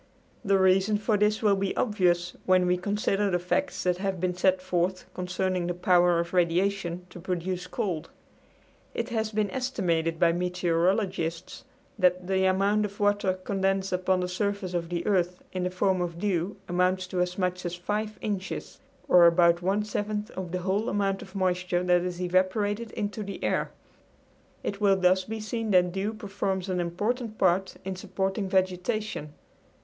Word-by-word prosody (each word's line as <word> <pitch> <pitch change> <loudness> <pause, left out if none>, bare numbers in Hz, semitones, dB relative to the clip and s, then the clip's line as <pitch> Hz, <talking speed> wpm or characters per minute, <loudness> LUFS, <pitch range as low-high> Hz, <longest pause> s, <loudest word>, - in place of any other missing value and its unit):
The 195 0 +3
reason 190 +2 +3
for 215 +1 +1
this 210 +2 +1
will 205 -2 +4
be 195 0 -2
obvious 175 -6 +1
when 185 -1 +4
we 180 0 +3
consider 200 +1 0
the 180 - +2
facts 180 +11 -1
that 180 -1 +1
have 195 -2 -2
been 180 +1 0
set 185 +1 +2
forth 185 0 -1
concerning 185 0 -1
the 175 - -2
power 175 -1 +4
of 170 +1 -3
radiation 180 0 +1
to - - -10
produce 180 +1 -3
cold. 175 -2 -3 0.9
It 230 +1 -2
has 220 -2 -1
been 210 -2 0
estimated 175 -11 -1
by 170 -1 +5
meteorologists 180 0 -1 0.3
that 180 -1 +3
the 190 0 +1
amount 200 +3 +2
of 200 0 -8
water 205 -2 +2
condensed 195 0 -1
upon 185 0 +1
the 180 - -1
surface 200 0 -2
of 170 -1 -2
the 175 -1 -3
earth 180 -3 0
in 185 -1 -1
the - - 0
form 185 0 +1
of 170 -1 -3
dew 185 +1 -1
amounts 185 +1 +1
to 180 -1 -1
as 180 0 -1
much 180 -1 -1
as 175 0 -3
five 210 +4 -3
inches, 200 -3 -4 0.3
or 175 -1 +7
about 170 0 +4
one 195 +4 +1
seventh 210 0 -3
of 185 -2 -6
the 180 0 -2
whole 200 +5 0
amount 195 -1 0
of 190 - -12
moisture 180 -1 0
that 180 -1 +3
is 180 0 -4
evaporated 195 +5 0
into 205 +1 -3
the 200 -1 -6
air. - - 0 0.9
It 200 +1 -4
will 200 -1 +5
thus 185 0 +3
be 220 0 -5
seen 225 +1 -3
that 180 -2 +4
dew 200 +4 -2
performs 195 -2 -3
an 180 -1 0
important 215 +7 -2
part 190 0 +2
in 190 0 -3
supporting 190 +1 -2
vegetation. 185 -3 -1
185 Hz, 170 wpm, -27 LUFS, 180-200 Hz, 0.9 s, or